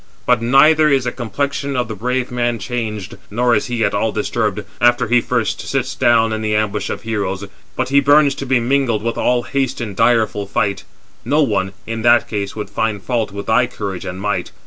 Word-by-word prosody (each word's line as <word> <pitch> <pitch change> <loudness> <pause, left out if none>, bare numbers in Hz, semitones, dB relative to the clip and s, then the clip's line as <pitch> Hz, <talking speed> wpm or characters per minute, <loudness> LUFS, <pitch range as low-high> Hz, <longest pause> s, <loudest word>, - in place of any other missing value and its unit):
But 125 -2 +3
neither 150 +6 +5
is 135 -3 +2
the 120 - -2
complexion 140 +4 -3
of 125 -2 0
the 110 - -5
brave 125 +4 -2
man 120 -1 0
changed, 115 -2 -5
nor 120 +3 +1
is 105 - +1
he 120 -2 0
at 100 - -1
all 110 +2 0
disturbed, 105 -1 -1 0.2
after 120 0 +3
he 120 +2 +3
first - - -1
sits - - -2
down 115 -2 +3
in 110 - -3
the 105 -1 0
ambush 105 -1 -1
of - - -5
heroes; 100 -3 -3 0.3
but 130 0 -1
he 140 +1 +5
burns 145 0 +4
to 135 - -4
be 130 -1 +3
mingled 120 -3 0
with 115 0 -2
all 125 -1 +1
haste 135 -1 -2
in 110 -5 -4
direful 110 -2 +1
fight—[no 105 +9 -2
one], 95 -6 -1
in 115 0 -4
that 120 +1 +4
case, 100 -2 -4
would 105 -2 -6
find 105 -1 -2
fault 115 -5 -1
with 100 +1 -6
thy 120 +2 +3
courage 100 -7 -5
and 90 +1 -6
might. 95 -3 -2
115 Hz, 205 wpm, -18 LUFS, 105-125 Hz, 0.3 s, neither